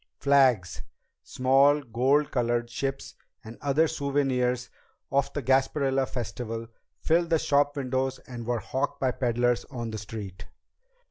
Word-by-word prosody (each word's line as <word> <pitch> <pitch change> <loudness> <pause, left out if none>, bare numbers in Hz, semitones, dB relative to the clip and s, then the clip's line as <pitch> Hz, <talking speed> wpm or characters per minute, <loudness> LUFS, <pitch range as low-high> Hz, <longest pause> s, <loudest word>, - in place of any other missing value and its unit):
Flags, 130 -11 +3 0.4
small 135 +3 +3
gold 135 +5 +1
colored 120 -1 0
ships, 135 +3 -4 0.3
and 110 +1 -10
other 145 +3 +2
souvenirs 135 -4 -1 0.4
of 140 0 +1
the 145 - -3
Gasparilla 135 +1 +2
Festival 115 -2 -5 0.3
filled 170 +1 +1
the 165 - +4
shopwindows 135 -3 0
and 120 -2 -8
were 120 -1 +1
hawked 130 +6 -3
by 130 -1 +1
peddlers 120 -1 0
on 120 -4 -6
the 110 - -5
street. 100 -3 -8
130 Hz, 125 wpm, -27 LUFS, 120-140 Hz, 0.4 s, the